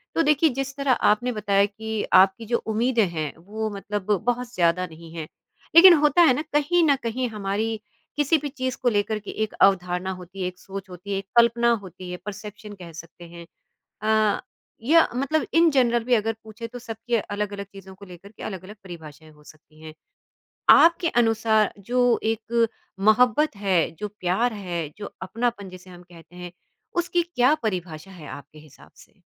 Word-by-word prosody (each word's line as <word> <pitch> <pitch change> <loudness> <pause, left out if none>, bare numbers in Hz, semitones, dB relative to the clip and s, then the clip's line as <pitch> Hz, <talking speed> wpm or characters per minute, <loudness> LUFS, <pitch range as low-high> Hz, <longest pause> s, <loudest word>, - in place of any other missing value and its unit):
तो 330 - +3
देखिए 300 +1 +3
जिस 270 +1 -4
तरह 280 -1 +1
आपने 245 +1 +2
बताया 200 -2 +2
कि 220 +1 -5
आपकी 190 +4 +5
जो 235 +2 +1
उम्मीदें 225 -1 +1
हैं, 155 -3 -4
वो 215 +5 -5
मतलब 205 0 -4
बहुत 245 0 -1
ज़्यादा 175 +1 +1
नहीं 165 0 -13
हैं, 160 -2 -5 0.5
लेकिन 350 +1 +10
होता 300 +2 +4
है 320 -6 +6
ना 255 - -2
कहीं 335 +4 +2
न 285 -3 +4
कहीं 245 +2 -2
हमारी 215 +1 -3 0.4
किसी 295 +2 +2
भी 290 0 -5
चीज़ 260 -2 -3
को 250 - +3
लेकर 215 0 -1
के 210 - -8
एक 215 - -5
अवधारणा 180 -1 +2
होती 185 +2 -10
है, 180 - -1
एक 180 0 -8
सोच 195 0 -8
होती 180 +2 -9
है, 195 - 0
एक 195 - -5
कल्पना 235 0 +4
होती 185 0 -10
है, 180 - -5
परसेप्शन 210 0 -8
कह 170 - -9
सकते 165 +1 -12
हैं। 170 0 -11 0.6
अ, 215 -1 +2 0.4
या 320 +6 +5
मतलब 280 +4 0
इन 330 0 +5
जनरल 240 -3 +2
भी 250 +2 0
अगर 225 0 -1
पूछे 220 +2 -8
तो 245 +2 -9
सबकी 230 0 -4
अलग-अलग 205 -1 -3
चीज़ों 190 -1 -12
को 200 - -13
लेकर 185 +2 -13
के - - -9
अलग-अलग 190 +1 -7
परिभाषाएँ 160 -4 -11
हो 150 0 -21
सकती 155 +1 -19
हैं। 155 -1 -9 0.8
आपके 335 +1 +6 0.2
अनुसार 220 -1 +2
जो 245 +5 0 0.2
एक 225 +1 0 0.3
मोहब्बत 230 +5 +3
है, 190 -5 +1
जो 210 - -3
प्यार 190 +7 +1
है, 175 -6 -4
जो 205 - -8
अपनापन 230 -4 -3
जिसे 185 0 -13
हम 175 0 -13
कहते 175 0 -17
हैं, 180 -1 -8 0.4
उसकी 350 0 +1
क्या 250 +4 +4
परिभाषा 180 -4 -4
है 165 -6 -11
आपके 145 +3 -11
हिसाब 150 -2 -17
से? - - -31
210 Hz, 180 wpm, -24 LUFS, 185-245 Hz, 0.8 s, लेकिन